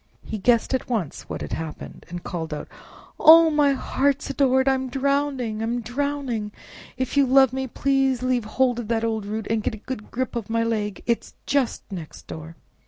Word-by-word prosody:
He 215 - -4
guessed 235 +4 +3
at 260 - -1
once 210 - -3
what - - -5
had - - -5
happened, 160 -1 -7
and 175 0 -6
called 160 -3 -4
out, - - -7 0.5
"Oh! 325 +1 +8
my 295 -2 +4
heart's 275 +1 0
adored! 265 -1 +3
I'm 265 -1 +1
drowning! 270 -4 0
I'm 235 +2 -1
drowning! 250 -4 -2 0.5
If 260 +2 -2
you 280 -1 +4
love 265 -1 +5
me, 265 0 -3 0.2
leave 255 -3 +2
hold 245 +2 +1
of 235 - -5
that 225 0 0
old 220 -3 -1
root 215 +1 -3
and 225 -1 0
get 215 - -2
a 215 - -15
good 250 -5 -6
grip 255 0 -3
of 225 -3 -4
my 230 0 +1
leg—it 225 +1 -1
is - - -15
just 275 -3 0
next 170 -5 -8
door!" 160 +1 -8
245 Hz, 185 wpm, -24 LUFS, 215-270 Hz, 0.5 s, Oh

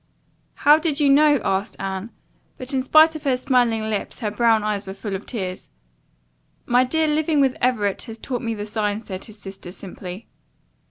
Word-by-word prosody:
"How 295 +2 +5
did 315 -2 -1
you 285 -2 +4
know?" 295 0 +5
asked 195 +2 -1
Anne, 190 +2 -4 0.5
but 255 +2 -5
in 265 - +1
spite 315 +4 +5
of 310 - -6
her 265 -3 +1
smiling 240 -4 +1
lips 210 -2 -3
her 210 -2 -1
brown 225 0 +3
eyes 210 -2 -2
were 190 - -6
full 200 0 -5
of 190 - -7
tears. 185 -5 -5 1.0
"My 245 +1 +4
dear, 320 +5 +1
living 305 0 +1
with 270 -2 +3
Everett 215 -6 +1
has 225 -1 -7
taught 245 +1 -4
me 230 -1 -2
the 205 -1 -5
signs," 210 0 -2
said 185 -1 -6
his 215 -1 -13
sister 195 -3 -9
simply. 185 +1 -9
225 Hz, 185 wpm, -22 LUFS, 205-270 Hz, 1.0 s, How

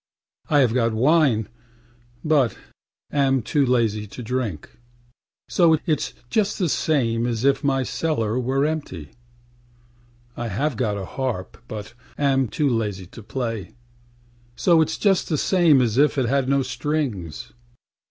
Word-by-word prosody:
I 145 -2 +4
have 120 -4 +2
got 115 -3 +1
wine, 130 -4 +3 0.8
but 145 -8 +2 0.5
am 135 -3 +2
too 145 +5 +1
lazy 115 -5 +1
to 120 +5 -9
drink; 115 - -4 0.7
So 165 -3 +4
itâs 155 -1 -2
just 210 - 0
the 180 -4 0
same 120 -7 +1
as 120 +1 -2
if 140 +2 +2
my 135 -2 +1
cellar 125 -6 -1
were 135 +3 0
empty. 140 - -4 1.2
I 120 - -4
have 130 +7 -1
got 105 -3 -1
a 95 - -5
harp, 120 -6 -4
but 105 -1 -7 0.2
am 135 -2 +2
too 145 +6 0
lazy 105 -7 -1
to 100 - -12
play; 115 -4 -5 0.8
So 170 +3 +4
itâs 160 - 0
just 195 -3 +2
the 155 - +1
same 165 -6 +4
as 115 +1 0
if 150 0 +3
it 130 - +2
had 135 +1 +1
no 140 0 +2
strings. 125 - -3
130 Hz, 145 wpm, -23 LUFS, 115-145 Hz, 1.2 s, I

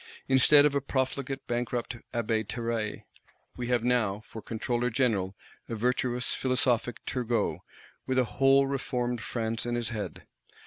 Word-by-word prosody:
Instead 145 +2 +7
of 150 - +3
a 140 - +1
profligate 135 0 -2
bankrupt 120 0 -2 0.2
Abbé 110 -3 0
Terray, 115 -2 -2 0.5
we 120 - -4
have 120 -2 +2
now, 110 -5 +1
for 110 - -9
Controller 120 +2 -1
General, 110 -7 +1 0.3
a 115 - -2
virtuous 125 +2 0
philosophic 125 -2 0
Turgot, 120 -2 0 0.5
with 130 0 0
a 130 - +5
whole 135 +5 +4
Reformed 125 -3 -2
France 115 0 -2
in 120 0 -1
his 120 -2 -1
head. 105 -5 -5
120 Hz, 140 wpm, -29 LUFS, 115-130 Hz, 0.5 s, Instead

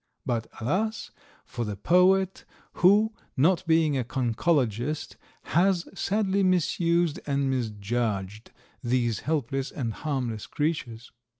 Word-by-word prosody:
But, 115 -2 -1
alas! 190 - -1 0.3
for 120 -3 -4
the 105 -2 -4
poet, 185 - +3 0.4
who, 210 +4 +5 0.2
not 165 +8 +3
being 160 -3 +3
a 130 - 0
conchologist, 125 +2 -1 0.3
has 175 +1 +2
sadly 200 0 0
misused 175 -3 +2
and 140 -1 +1
misjudged 110 -3 -2 0.3
these 120 -2 0
helpless 135 -3 -2
and 120 -6 -4
harmless 125 -8 -3
creatures. 130 -7 -3
140 Hz, 105 wpm, -27 LUFS, 120-175 Hz, 0.4 s, who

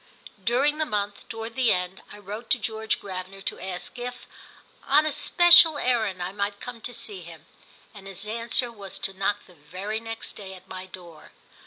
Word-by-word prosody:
During 275 +7 +3
the 310 - +2
month, 205 -3 -2
toward 225 0 -6
the 255 -3 +4
end, 180 +1 -1
I 210 - -10
wrote 210 +3 -7
to - - +4
George 220 0 -1
Gravener 190 0 -7
to - - -2
ask 190 +5 -4
if, 245 0 -6 0.6
on 295 +3 +6
a 310 - +2
special 345 0 +7
errand, 220 -9 +1
I 180 - -3
might 200 0 -2
come 245 -2 -8
to 245 - -4
see 220 -5 -6
him, 165 -3 -12 0.5
and 200 -2 -11
his 195 +1 -4
answer 230 +2 +1
was 200 -4 -8
to 195 - -2
knock 195 +2 -1
the 180 - -18
very 185 +8 -5
next 225 0 -5
day 190 -2 -9
at 185 0 -15
my 185 0 -7
door. 175 -4 -12
205 Hz, 190 wpm, -26 LUFS, 190-235 Hz, 0.6 s, special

